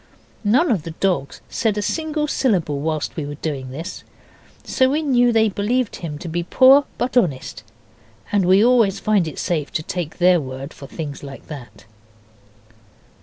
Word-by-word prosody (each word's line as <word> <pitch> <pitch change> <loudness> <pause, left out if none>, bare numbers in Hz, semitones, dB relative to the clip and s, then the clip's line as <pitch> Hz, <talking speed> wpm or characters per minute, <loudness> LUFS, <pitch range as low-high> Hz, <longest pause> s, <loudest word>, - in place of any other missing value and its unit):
None 250 +9 +3
of 200 -8 +1
the 165 0 -8
dogs 180 -8 -1
said 215 -2 -1
a 210 - -1
single 310 +4 -1
syllable 185 - 0
while 155 0 -1
we 160 - -3
were 145 0 -5
doing 140 -4 -4
this, 155 +6 -7 0.6
so 260 0 +2
we 300 +3 0
knew 245 -4 +3
they 220 -1 +4
believed 215 +4 -1
him 155 -4 -6
to 170 - -8
be 170 +1 -2
poor 265 +10 +6
but 250 +1 -2
honest, 165 - 0 0.7
and 200 -3 +2
we 195 +4 +5
always 235 -6 +3
find 205 -6 +2
it 155 - -7
safe 155 -5 -2
to 155 - -1
take 170 -1 -4
their 180 0 +5
word 135 +2 -7
for 140 - -11
things 145 -3 -6
like 140 -1 -10
that. 120 -9 -10
180 Hz, 170 wpm, -21 LUFS, 150-240 Hz, 0.7 s, poor